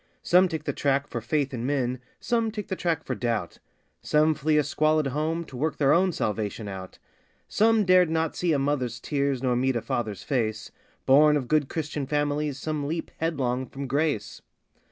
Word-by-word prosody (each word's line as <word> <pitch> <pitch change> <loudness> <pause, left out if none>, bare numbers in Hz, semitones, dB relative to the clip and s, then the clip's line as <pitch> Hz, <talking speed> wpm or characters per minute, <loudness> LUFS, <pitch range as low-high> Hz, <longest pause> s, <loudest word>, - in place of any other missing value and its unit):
Some 180 +2 +5
take 160 -3 -4
the - - -2
track 140 0 +1
for - - -5
faith 145 -3 -1
in 120 -2 -4
men 130 -2 -1 0.2
some 230 -2 0
take 210 -2 -6
the 190 - -1
track 165 -3 -1
for 130 - -3
doubt 115 -8 -2 0.4
Some 155 +1 +3
flee 155 +1 +1
a 150 - +4
squalid 155 +1 +1
home 155 +5 -1
to 150 - -12
work 150 +5 -1
their 140 -2 +4
own 185 +2 +3
salvation 105 - -3
out. 95 -2 -8 0.5
Some 220 -1 +3
dared 185 -2 +5
not 160 0 -1
see 175 -2 0
a 150 - +3
mother's 135 -4 -1
tears 140 -1 -1
nor 125 -2 +2
meet 130 +1 +1
a 120 - 0
father's 110 -4 -3
face 110 -3 -2 0.3
Born 150 +2 +6
of 130 -4 -4
good 150 -1 +2
Christian 150 -3 -3
families 145 -1 -1
some 150 0 -3
leap, 165 +2 -4
head 165 -1 -1
long, 125 0 -1
from 140 +1 -6
Grace. 135 -6 -1
145 Hz, 195 wpm, -26 LUFS, 125-160 Hz, 0.5 s, Born